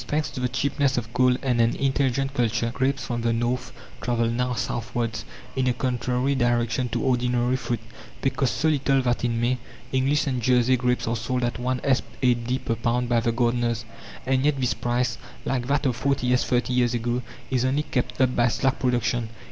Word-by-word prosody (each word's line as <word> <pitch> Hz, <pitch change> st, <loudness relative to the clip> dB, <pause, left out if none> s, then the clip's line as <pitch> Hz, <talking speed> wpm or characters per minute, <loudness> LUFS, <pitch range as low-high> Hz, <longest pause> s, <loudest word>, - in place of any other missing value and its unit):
Thanks 150 Hz, 0 st, -1 dB
to -, -, -6 dB
the 125 Hz, 0 st, 0 dB
cheapness 140 Hz, +1 st, 0 dB
of 115 Hz, -1 st, -3 dB
coal 125 Hz, 0 st, +4 dB
and 125 Hz, -3 st, +2 dB
an 115 Hz, +1 st, +2 dB
intelligent 135 Hz, 0 st, 0 dB
culture, 115 Hz, -2 st, 0 dB
grapes 135 Hz, +2 st, 0 dB
from 120 Hz, -1 st, -2 dB
the 115 Hz, 0 st, +1 dB
north 120 Hz, +2 st, -1 dB, 0.3 s
travel 115 Hz, -1 st, +1 dB
now 125 Hz, +1 st, -1 dB
southwards, 115 Hz, 0 st, -2 dB, 0.3 s
in 130 Hz, -1 st, +1 dB
a 125 Hz, -, +3 dB
contrary 125 Hz, +1 st, 0 dB
direction 120 Hz, -1 st, +1 dB
to -, -, -2 dB
ordinary 125 Hz, -1 st, +1 dB
fruit. 120 Hz, -3 st, -2 dB, 0.4 s
They 135 Hz, -, +3 dB
cost 130 Hz, 0 st, 0 dB
so 160 Hz, -, +2 dB
little 135 Hz, -3 st, +2 dB
that 120 Hz, -1 st, 0 dB
in 115 Hz, -1 st, 0 dB
May, 125 Hz, +2 st, +1 dB, 0.3 s
English 135 Hz, +3 st, +2 dB
and 130 Hz, -3 st, -1 dB
Jersey 125 Hz, +1 st, +4 dB
grapes 125 Hz, -1 st, 0 dB
are 115 Hz, -, 0 dB
sold 125 Hz, +3 st, -2 dB
at 120 Hz, 0 st, -1 dB
1s. 130 Hz, +1 st, +1 dB, 0.2 s
8d. 125 Hz, +1 st, +1 dB
per 115 Hz, -, 0 dB
pound 120 Hz, +1 st, 0 dB
by 120 Hz, -1 st, +3 dB
the 115 Hz, +1 st, +1 dB
gardeners, 120 Hz, -1 st, 0 dB, 0.4 s
and 130 Hz, 0 st, +2 dB
yet 145 Hz, -1 st, +2 dB
this 125 Hz, -2 st, +1 dB
price, 120 Hz, 0 st, -1 dB, 0.3 s
like 125 Hz, -2 st, -1 dB
that 140 Hz, 0 st, +1 dB
of 125 Hz, -3 st, 0 dB
40s. 125 Hz, -2 st, +2 dB
thirty 125 Hz, 0 st, +1 dB
years 125 Hz, -1 st, +2 dB
ago, 120 Hz, +1 st, -1 dB, 0.3 s
is 125 Hz, -2 st, +2 dB
only 135 Hz, +3 st, +1 dB
kept 125 Hz, -3 st, -2 dB
up 130 Hz, -1 st, +3 dB
by 120 Hz, 0 st, +4 dB
slack 135 Hz, +3 st, 0 dB
production. 120 Hz, -2 st, 0 dB
125 Hz, 195 wpm, -25 LUFS, 120-130 Hz, 0.4 s, coal